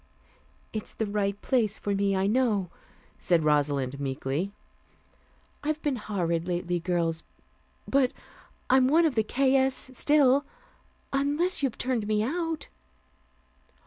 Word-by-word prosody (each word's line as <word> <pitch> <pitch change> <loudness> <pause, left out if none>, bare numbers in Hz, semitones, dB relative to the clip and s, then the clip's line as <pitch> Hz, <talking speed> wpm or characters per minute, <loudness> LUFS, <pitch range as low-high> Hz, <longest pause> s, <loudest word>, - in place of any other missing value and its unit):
"It's 215 - -5
the 220 - -1
right 200 -1 -1
place 225 -6 +1
for 205 - -2
me, 200 0 +1
I 190 0 +1
know," 210 -5 +1 0.5
said 170 -3 +2
Rosalind 140 -3 +1
meekly. 140 +6 -2 1.1
"I've 305 +1 -1
been 290 -4 0
horrid 175 -6 -2
lately, 175 0 -1
girls, 170 -2 -1 0.7
but 270 -2 +3 0.6
I'm 255 0 +5
one 325 +5 +4
of 310 - +2
the 225 - +2
'K. 265 +5 +1
S.' 265 -1 +1
still, 280 0 +4 0.7
unless 295 +7 0
you've 270 -5 -1
turned 245 -5 -1
me 215 0 +1
out." 325 +4 -2
215 Hz, 125 wpm, -27 LUFS, 175-270 Hz, 1.1 s, I'm